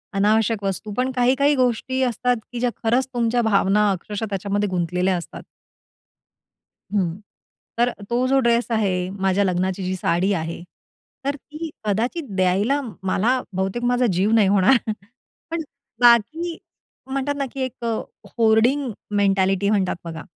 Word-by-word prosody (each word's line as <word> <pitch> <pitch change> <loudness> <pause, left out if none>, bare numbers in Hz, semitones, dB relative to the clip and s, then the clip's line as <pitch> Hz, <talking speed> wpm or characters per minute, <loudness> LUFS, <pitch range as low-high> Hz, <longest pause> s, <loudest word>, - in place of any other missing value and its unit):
अनावश्यक 210 +1 +2
वस्तू. 195 +2 -3
पण 255 +1 +1
काही-काही 260 +3 +3
गोष्टी 260 +1 0
असतात, 250 0 +1 0.2
की 245 - -5
ज्या 245 - +1
खरंच 245 +4 +2
तुमच्या 240 0 +1
भावना 210 -1 +3
अक्षरशः 205 +3 -4
त्याच्यामध्ये 200 +1 -1
गुंतलेल्या 180 +1 0
असतात. 170 - -8 1.5
हं, 190 -3 -1 0.6
तर 240 +1 +3 0.2
तो 245 +2 +1
जो 270 +1 +3
ड्रेस 235 -1 +2
आहे, 185 -5 0
माझ्या 195 0 +1
लग्नाची 185 0 -1
जी 185 - -1
साडी 185 +1 +1
आहे, 165 -1 -4 0.6
तर 280 +1 0
ती 305 +3 -8 0.2
कदाचित 235 - -1
द्यायला 195 +9 +2 0.2
मला, 230 +7 +1
बहुतेक 190 +6 -2
माझा 245 +1 +2
जीव 190 +5 +1
नाही 215 -4 +5
होणार, 200 +6 +5 0.7
पण 335 0 -1 0.4
बाकी 310 +9 +4 0.5
म्हणतात 275 +1 -1
ना, 275 - -1
की 270 - -7
एक 255 -2 -4 0.5
होर्डिंग 235 +4 +3 0.3
मेंटॅलिटी 195 0 +2
म्हणतात 200 -3 +1
बघा, 160 -1 -6
220 Hz, 135 wpm, -22 LUFS, 190-250 Hz, 1.5 s, नाही